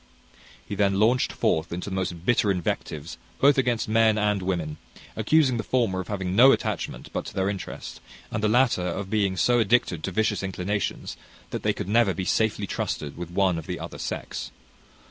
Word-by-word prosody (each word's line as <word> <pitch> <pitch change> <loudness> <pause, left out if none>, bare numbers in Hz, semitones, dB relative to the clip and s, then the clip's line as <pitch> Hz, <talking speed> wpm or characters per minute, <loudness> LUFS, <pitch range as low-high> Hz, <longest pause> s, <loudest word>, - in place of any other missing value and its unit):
He - - -5
then 100 -1 +2
launched 120 +4 +3
forth 80 +1 0
into 90 +3 -4
the - - -2
most 90 -2 -3
bitter 110 -2 +3
invectives 80 -4 -3 0.2
both 140 0 +5
against 120 -3 0
men 110 0 +4
and 105 -2 +1
women; 85 -5 -2 0.4
accusing 145 -6 +3
the 110 - -2
former 115 -8 0
of 95 - -5
having 95 -3 -3
no 130 +5 +8
attachment - - -2
but - - -2
to - - -9
their 95 0 +1
interest, 100 - -7 0.3
and 110 - -2
the 105 - +2
latter 120 -3 +3
of 95 +3 -3
being 100 -4 +1
so 120 +4 +3
addicted 105 -7 +2
to 95 - -2
vicious 110 +1 0
inclinations 95 +1 -3 0.3
that - - -3
they - - +2
could - - -5
never 105 -2 +3
be 95 - -3
safely 110 -1 +1
trusted 75 -6 -3
with 85 -1 -6
one 90 -1 +1
of 80 - -10
the - - -4
other - - -7
sex. - - -5
100 Hz, 190 wpm, -25 LUFS, 90-115 Hz, 0.4 s, no